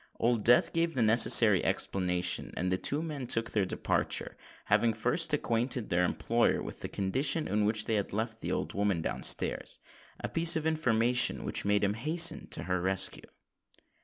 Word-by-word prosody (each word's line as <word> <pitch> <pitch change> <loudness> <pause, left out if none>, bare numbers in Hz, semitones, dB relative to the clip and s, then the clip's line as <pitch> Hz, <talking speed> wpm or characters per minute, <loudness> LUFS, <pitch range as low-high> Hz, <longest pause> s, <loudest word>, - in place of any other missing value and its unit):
Old 115 -2 -1
Death 120 +1 +3
gave 165 0 -2
the 120 - 0
necessary 110 -2 +6
explanation; 90 -2 -1
and 90 +1 -3
the 95 - 0
two 150 +3 -2
men 145 -6 -7
took 115 0 0
their 105 -3 -1
departure, - - -3 0.3
having 115 -1 +1
first 150 +9 +1
acquainted 120 -4 -2
their 90 +1 +1
employer 115 +6 -1
with - - -9
the - - -7
condition 135 - -1
in 105 0 -1
which 110 0 -1
they 115 - -3
had 100 -2 -3
left 110 +2 -5
the - - -5
old - - -4
woman 100 -5 -2
down - - -5
stairs—a - - -2
piece 165 +1 +3
of 160 -1 -4
information 125 -6 +1
which - - +1
made 105 0 0
him 100 0 0
hasten 155 +9 +1
to - - 0
her 90 -1 -3
rescue. 95 +1 0
115 Hz, 175 wpm, -28 LUFS, 100-135 Hz, 0.3 s, necessary